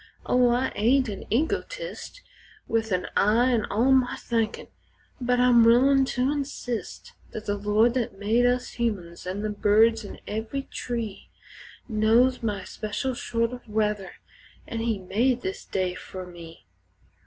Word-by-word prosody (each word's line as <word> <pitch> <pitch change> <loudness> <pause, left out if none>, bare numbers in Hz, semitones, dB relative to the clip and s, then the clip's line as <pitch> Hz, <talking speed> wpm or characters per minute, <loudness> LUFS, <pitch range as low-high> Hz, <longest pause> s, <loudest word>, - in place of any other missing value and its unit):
Oh, 250 -1 +4
I 245 +2 +1
ain't 255 +3 +2
an 195 -2 -6
egotist, - - -3 0.4
With 225 -1 -1
an 180 -1 0
"I" 230 +5 +3
in 230 -4 +1
all 235 +6 +2
my 260 -2 +3
thinkin', 225 -2 -2 0.6
but 250 0 +1
I'm 245 -2 +6
willin' 265 +4 +5
to 260 +1 0
insist 275 -5 -5 0.2
That 215 - -6
the 205 - 0
Lord 210 +3 +2
that 235 -6 -2
made 225 +5 +2
us 245 0 0
humans 180 -7 -3
an' 195 +3 -3
the 215 - -1
birds 220 +2 +3
in 200 - -9
every 220 +6 -4
tree 230 -6 -5 0.6
Knows 230 +4 +3
my 205 -4 -2
special 215 +7 -3
sort 230 -1 -1
o' 250 0 -7
weather 210 -2 -1 0.5
an' 230 - -5
He 225 -2 0
made 235 +7 0
this 190 - -4
day 185 -1 -1
fer 185 0 -8
me. 170 - -12
230 Hz, 150 wpm, -26 LUFS, 205-250 Hz, 0.6 s, I'm